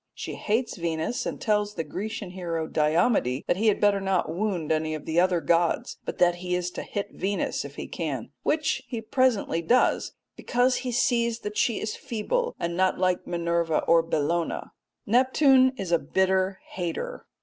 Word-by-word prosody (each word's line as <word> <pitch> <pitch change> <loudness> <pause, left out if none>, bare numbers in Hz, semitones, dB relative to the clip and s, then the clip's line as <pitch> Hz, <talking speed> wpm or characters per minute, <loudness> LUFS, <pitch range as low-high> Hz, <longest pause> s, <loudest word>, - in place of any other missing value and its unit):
She - - -5
hates 225 +2 -1
Venus, 170 +6 -2
and - - -4
tells 210 -1 0
the 165 - -2
Grecian 200 +4 -5
hero 170 -3 -3
Diomede 155 - +1
that - - +1
he 220 +3 +1
had 210 - +3
better 205 -1 +3
not 190 -4 0
wound 180 -4 -1
any 155 0 0
of 150 - -8
the 160 +1 +1
other 180 -1 +3
gods, 170 +2 +1
but - - -4
that 175 -1 +3
he 180 0 -2
is 180 0 -2
to - - -5
hit 205 0 -4
Venus 200 +1 -2
if - - -9
he - - -5
can, - - -4
which 310 0 0
he 235 - -4
presently 225 -7 +1
does 240 +10 +2 0.2
'because 250 +1 +1
he 255 - -3
sees 235 -1 +1
that 210 0 -5
she 230 -1 +1
is 215 - -3
feeble 375 - -2
and 170 0 -2
not 185 +1 +2
like 185 -1 0
Minerva 170 -2 0
or 170 0 +5
Bellona.' 165 +1 -1 0.3
Neptune 260 +3 +5
is 190 -5 -4
a 170 - +4
bitter 190 +4 +1
hater. 185 - -4
190 Hz, 180 wpm, -26 LUFS, 170-225 Hz, 0.3 s, or